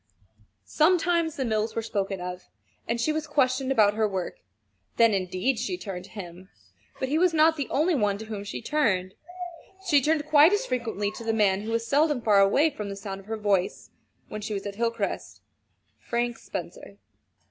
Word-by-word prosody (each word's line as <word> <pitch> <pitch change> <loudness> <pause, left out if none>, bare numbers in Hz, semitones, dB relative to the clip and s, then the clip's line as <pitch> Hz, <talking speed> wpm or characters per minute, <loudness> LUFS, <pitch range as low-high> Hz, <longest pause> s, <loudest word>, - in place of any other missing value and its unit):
Sometimes 335 0 +2
the 265 - -2
mills 220 -1 -1
were 230 - -1
spoken 195 -3 -2
of, 180 0 -7 0.4
and 235 0 -1
she 305 +6 +1
was 310 0 -3
questioned 265 -2 +1
about 210 -5 +4
her 215 0 +1
work. 190 -3 -4 0.6
Then, 230 -2 +5
indeed, 190 +6 0
she 260 +10 -2
turned 190 - -6
to - - -15
him 185 -2 -10 0.5
but 260 - -1
he 300 +4 +1
was 355 -2 +3
not 320 +1 +5
the 285 -3 -4
only 320 +6 +2
one 205 -8 +1
to 220 - -8
whom 215 -2 -6
she 205 +3 -6
turned: 210 -11 +1 0.7
she 290 -5 +5
turned 305 +2 +1
quite 305 +4 +6
as 415 - +1
frequently 225 -5 -2
to 230 - -9
the 225 0 0
man 200 -3 +2
who 215 - -6
was 230 0 0
seldom 295 +1 +2
far 210 -4 +4
away 280 +11 +4
from 210 -6 -6
the 200 - -5
sound 195 -1 -6
of 195 - -16
her 225 0 -3
voice 200 -3 -1 0.4
when 215 - -6
she 210 0 -3
was 195 - -5
at 200 - -4
Hilcrest 230 -1 -3 0.6
Frank 240 0 -2
Spencer. - - -8
225 Hz, 190 wpm, -26 LUFS, 200-290 Hz, 0.7 s, quite